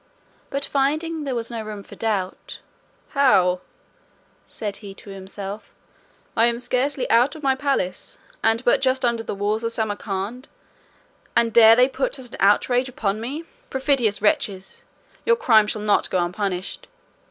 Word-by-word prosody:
But 275 Hz, 0 st, -1 dB
finding 305 Hz, +3 st, -1 dB
there 265 Hz, -2 st, -2 dB
was 235 Hz, 0 st, -3 dB
no 230 Hz, -1 st, -4 dB
room 210 Hz, -2 st, -7 dB
for -, -, -14 dB
doubt, 200 Hz, -5 st, -3 dB, 0.5 s
"How!" 185 Hz, -, +3 dB, 0.9 s
said 205 Hz, -2 st, -4 dB
he 200 Hz, -2 st, -10 dB
to 200 Hz, -, -11 dB
himself, 195 Hz, +2 st, -7 dB, 0.6 s
"I 230 Hz, -, +5 dB
am 235 Hz, 0 st, 0 dB
scarcely 255 Hz, +3 st, -1 dB
out 245 Hz, +6 st, +4 dB
of 310 Hz, -, -11 dB
my 270 Hz, -1 st, +3 dB
palace, 265 Hz, -10 st, -2 dB, 0.3 s
and 225 Hz, +2 st, +2 dB
but 240 Hz, -, +4 dB
just 260 Hz, -1 st, +1 dB
under 235 Hz, -1 st, +1 dB
the 225 Hz, -, -5 dB
walls 210 Hz, +3 st, -1 dB
of 230 Hz, -, -1 dB
Samarcand, 210 Hz, +2 st, -3 dB, 0.9 s
and 230 Hz, -1 st, +3 dB
dare 225 Hz, -1 st, +8 dB
they 250 Hz, +2 st, +5 dB
put -, -, -2 dB
such 255 Hz, -2 st, -8 dB
an -, -, -9 dB
outrage 245 Hz, +6 st, +3 dB
upon 215 Hz, -4 st, -2 dB
me? 280 Hz, +8 st, -4 dB, 0.3 s
Perfidious 260 Hz, -, +1 dB
wretches! 190 Hz, -2 st, 0 dB, 0.4 s
your 470 Hz, -, +4 dB
crime 220 Hz, -, +4 dB
shall 210 Hz, 0 st, -3 dB
not 210 Hz, -1 st, +2 dB
go -, -, 0 dB
unpunished. 180 Hz, +1 st, -3 dB
230 Hz, 155 wpm, -23 LUFS, 205-260 Hz, 0.9 s, dare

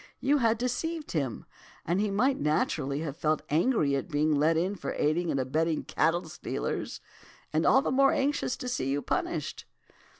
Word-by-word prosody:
'You 280 Hz, +2 st, +2 dB
had 230 Hz, -2 st, +3 dB
deceived 300 Hz, +7 st, -3 dB
him, 140 Hz, -7 st, -2 dB, 0.4 s
and 175 Hz, +5 st, +1 dB
he 210 Hz, -, +1 dB
might 245 Hz, +8 st, +1 dB
naturally 145 Hz, -1 st, 0 dB
have 150 Hz, -4 st, -4 dB
felt 155 Hz, -2 st, 0 dB
angry 155 Hz, -, +2 dB
at 135 Hz, +6 st, -3 dB
being 155 Hz, 0 st, +2 dB
let 155 Hz, +3 st, +3 dB
in 180 Hz, +4 st, 0 dB
for -, -, -4 dB
aiding 165 Hz, +3 st, 0 dB
and 140 Hz, -, 0 dB
abetting 155 Hz, +5 st, 0 dB
cattle 165 Hz, +2 st, 0 dB
stealers, 155 Hz, -, -4 dB, 0.5 s
and 155 Hz, +1 st, +2 dB
all 270 Hz, -, +5 dB
the -, -, -1 dB
more 275 Hz, +1 st, +5 dB
anxious 275 Hz, -2 st, 0 dB
to 250 Hz, -, -6 dB
see 190 Hz, -, -1 dB
you 140 Hz, +1 st, -1 dB
punished. -, -, -2 dB
165 Hz, 175 wpm, -29 LUFS, 150-245 Hz, 0.5 s, all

